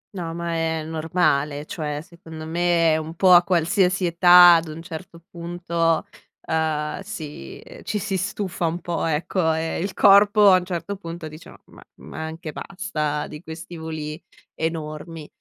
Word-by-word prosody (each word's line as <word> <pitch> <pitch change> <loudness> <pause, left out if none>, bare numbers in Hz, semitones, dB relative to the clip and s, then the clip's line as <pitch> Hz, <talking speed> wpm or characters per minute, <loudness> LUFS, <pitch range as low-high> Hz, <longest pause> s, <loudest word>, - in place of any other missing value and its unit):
No, 170 -3 -4
ma 170 0 -3
è 160 -1 -1
normale, 155 -2 0
cioè 150 -3 -4
secondo 160 -2 -11
me 170 -1 +2
è - - +2
un 160 +1 -6
po' 185 +1 +4
a 175 - +9
qualsiasi 180 +1 +1
età 175 0 +8
ad 165 0 -4
un 160 +2 -8
certo 170 -1 -9
punto, 170 -1 -1 0.4
uhm, 155 -1 -1
si 150 - -8 0.2
ci 210 - -3
si 200 -1 -2
stufa 190 -2 -2
un 170 +2 -3
po', 175 -2 -3
ecco, 160 +1 0
e 160 +1 -2
il 190 +2 -3
corpo 205 0 +6
a 185 - +6
un 180 - -8
certo 185 +2 -4
punto 170 -3 -7
dice: 155 +2 -12
"Ma - - -14
ma - - -15 0.2
ma 160 - -7
anche 160 0 -7
basta 155 -7 -3
di 150 0 -10
questi 165 +1 -9
voli 160 -1 -6 0.3
enormi." 160 -1 -5
165 Hz, 165 wpm, -23 LUFS, 160-180 Hz, 0.4 s, a